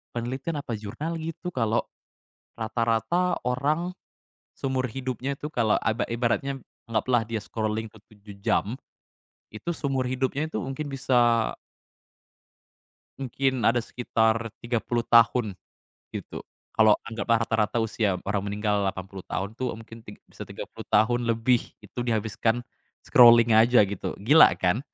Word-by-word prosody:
Penelitian 130 +7 -3
apa 115 -6 -4
jurnal 155 +11 -5
gitu 165 +2 -5
kalau 115 -5 0 0.7
rata-rata 115 - 0
orang 145 +8 0 0.6
seumur 130 -1 -2
hidupnya 130 +2 -3
itu 145 +2 -6
kalau 115 -8 +1
aba 110 +1 0
ibaratnya 125 +3 -1 0.2
anggaplah 115 +1 +1
dia 110 0 -3
scrolling 110 +1 -3
tuh 110 -1 -19
7 100 -1 -13
jam, 110 +5 +1 0.7
itu 110 +11 -6
seumur 135 -4 -1
hidupnya 130 +4 -1
itu 160 - -4
mungkin 135 +3 -4
bisa 120 -4 +2 1.7
Mungkin 130 -1 -1
ada 120 +1 +4
sekitar 115 -1 0
30 120 0 -1
tahun, 115 -3 +4 0.6
gitu. - - -7 0.3
Kalau 110 -1 +6
anggaplah 115 0 0
rata-rata 110 +1 +1
usia 105 -4 0
orang 100 -1 0
meninggal 105 -1 0
80 95 -1 -4
tahun 100 +3 -4
tuh, 125 0 -2
mungkin 115 0 -11
tig 105 - -12
bisa - - -9
30 - - -9
tahun 120 +3 +3
lebih 115 +1 +2 0.2
itu - - -10
dihabiskan 110 0 0 0.5
scrolling 115 -2 +7
aja 115 -1 +6
gitu, 100 -1 -4
gila 145 +11 +7
kan? 95 +8 +1
115 Hz, 130 wpm, -26 LUFS, 110-130 Hz, 1.7 s, scrolling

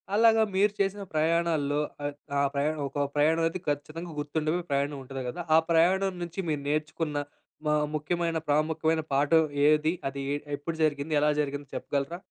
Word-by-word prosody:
అలాగా 225 0 +5
మీరు 205 +1 +3
చేసిన 200 +1 0
ప్రయాణాల్లో 155 -2 +1 0.3
ఆహ్, 145 - -2 0.3
ఆ - - +3
ప్రయాణం 150 +2 0
ఒక 145 0 -1
ప్రయాణం 160 +3 +3
అయితే 175 +3 -4
ఖచ్చితంగా 155 +4 -4
గుర్తుండే 155 +3 -1
ప్రయాణం 140 +1 0
ఉంటుంది 135 0 -6
కదా! 175 - -5
ఆ - - +8
ప్రయాణం 185 +4 +3
నుంచి 175 +2 -7
మీరు 150 -2 -1
నేర్చుకున్న 155 0 -1 0.5
మా 150 - +3 0.2
ముఖ్యమైన 165 +2 -1
ప్రాముఖ్యమైన 160 +2 +2
పాఠం 150 +4 +4 0.2
ఏది? 155 +1 +3 0.2
అది 140 0 -6
ఎ - - +1 0.2
ఎప్పుడు 160 +3 -4
జరిగింది? 150 0 0
ఎలా 150 - +4
జరిగింది 145 0 -4
చెప్పగలరా? 140 +4 -2
155 Hz, 155 wpm, -28 LUFS, 145-170 Hz, 0.5 s, ఆ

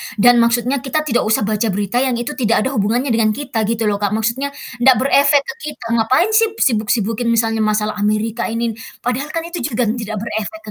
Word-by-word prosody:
Dan 240 +3 +5
maksudnya 240 +3 +1
kita 275 +4 -2
tidak 245 -7 0
usah 220 0 +2
baca 215 +2 0
berita 205 +4 -1
yang 260 -2 +1
itu 240 +4 -3
tidak 230 -5 +1
ada - - 0
hubungannya 235 +4 0
dengan 215 -2 +2
kita 255 -5 -3
gitu 230 0 -1
loh, 205 -1 0
Kak. 205 0 0
Maksudnya 230 +6 -1 0.3
ndak 260 +1 +6
berefek 280 +3 +4
ke 270 - -6 0.2
kita. 295 - -11
Ngapain 255 - +2
sip 440 0 +3
sibuk-sibukin, 225 -1 0
misalnya 225 -1 +1
masalah 215 0 0
Amerika 215 +2 -1
ini, 230 0 -2 0.3
padahal 250 +4 -2
kan 330 +1 -3
itu 345 +1 -5
juga 230 -2 -1
tidak 215 -1 -5
berefek 230 +8 -4
230 Hz, 195 wpm, -18 LUFS, 215-265 Hz, 0.3 s, ndak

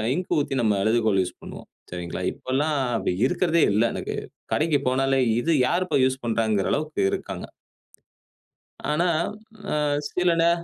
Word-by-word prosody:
Ink 180 - -4
ஊத்தி 140 - -2
நம்ம 105 -3 +2
எழுதுகோள் 110 -2 +2
use 90 - -8
பண்ணுவோம். - - -10 0.2
சரிங்களா. 90 -1 -5
இப்பல்லாம் 145 +4 -1 0.2
அப்படி 100 - 0
இருக்கதே 170 0 +2
இல்ல 110 - +3
எனக்கு. - - -4 0.4
கடைக்கு 155 -2 +2
போனாலே, 135 +1 +2 0.2
இது 165 +7 0 0.2
யார் 180 +2 +1
இப்ப - - +1
யூஸ் 130 +1 -1
பண்ணறாங்கங்கிற 110 -3 +1
அளவுக்கு 155 +1 -2
இருக்காங்க. - - -4 1.4
ஆனா 160 +4 +2 0.6
அ - - 0 0.3
சில 180 -1 +1
நே 170 - +5
135 Hz, 140 wpm, -24 LUFS, 110-165 Hz, 1.4 s, நே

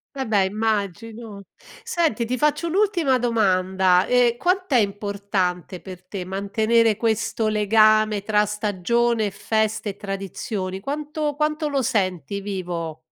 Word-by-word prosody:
Vabbè, 220 -7 +1
immagino. 215 +1 -3 0.4
Senti, 310 -10 0
ti 250 +2 -2
faccio 300 +4 +1
un'ultima 345 -7 +2
domanda: 190 -5 +2
ehm, 245 -1 +3
quant'è 365 -4 +1
importante 200 -4 -2
per 185 -1 -10
te 185 0 -6
mantenere 215 +4 +1
questo 220 0 0
legame 215 0 +3
tra 210 0 +2
stagione 215 +3 0
e 205 - -2
feste 220 +1 -1
e 195 - -6
tradizioni? 195 -1 -5
Quanto 300 - -3
quanto 305 +1 0
lo 280 -2 0
senti 200 - -1
vivo? 175 -5 -5
215 Hz, 120 wpm, -23 LUFS, 195-240 Hz, 0.4 s, ehm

